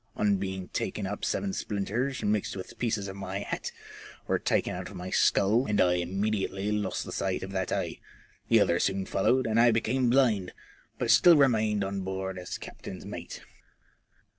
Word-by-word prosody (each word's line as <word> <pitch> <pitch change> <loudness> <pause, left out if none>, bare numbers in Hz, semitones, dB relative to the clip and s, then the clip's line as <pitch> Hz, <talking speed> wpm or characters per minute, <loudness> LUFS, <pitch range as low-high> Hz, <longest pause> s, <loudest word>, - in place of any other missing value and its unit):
On 100 -1 +2
being 95 -1 -4
taken 105 - -3
up 100 +2 -5
seven 195 -1 -1
splinters, 115 - -2
mixed 105 -1 0
with 95 - -8
pieces 110 -4 -1
of 95 - -7
my 100 0 -4
hat, 105 - -4 0.5
were - - +1
taken - - 0
out 90 0 -6
of 100 - -11
my 90 +1 -6
skull, 110 +6 +3
and 105 -1 +1
I 90 -1 +4
immediately 95 +2 -1
lost 105 -2 -1
the - - -7
sight 95 -1 -2
of 95 - -6
that 95 -1 -2
eye; 90 -4 -2 0.5
the - - +5
other 85 - +2
soon 95 0 0
followed, 130 +8 +2
and 110 0 +2
I 120 - +6
became 120 +3 +1
bhnd, 115 -8 +3 0.5
but - - +1
still 175 -3 +7
remained 110 -7 +3
on 100 0 -3
board 95 0 -4
as 90 - -5
captain's - - -9
mate. - - -7
100 Hz, 180 wpm, -28 LUFS, 95-110 Hz, 0.5 s, still